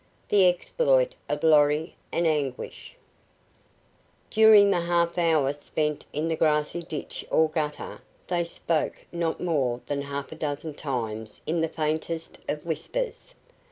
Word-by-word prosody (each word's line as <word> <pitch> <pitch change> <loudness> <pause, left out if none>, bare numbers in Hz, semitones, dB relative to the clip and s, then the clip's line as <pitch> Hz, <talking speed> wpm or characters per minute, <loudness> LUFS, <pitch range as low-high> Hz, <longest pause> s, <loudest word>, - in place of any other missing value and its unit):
THE 195 -3 +6
EXPLOIT - - +2 0.2
OF 145 0 -2
LORRY 150 0 +4 0.2
AND 170 - +1
ANGUISH 145 -5 -2 1.3
During 215 -2 +7
the 175 - +2
half 170 0 +1
hour 155 -5 +3
spent 150 +1 -3
in 150 +3 -2
the 165 - 0
grassy 155 +1 +1
ditch 160 -3 -5
or 160 - +4
gutter, 155 -1 -3 0.2
they 175 -1 0
spoke 165 -1 -2
not 170 -2 -1
more 135 -9 0
than 145 -1 -2
half 140 0 -5
a - - -7
dozen 150 +1 -4
times 110 -7 -4
and 165 - 0
in - - +1
the 165 - +2
faintest 160 +1 -3
of 150 +2 -3
whispers. 480 - -3
160 Hz, 140 wpm, -26 LUFS, 145-170 Hz, 1.3 s, During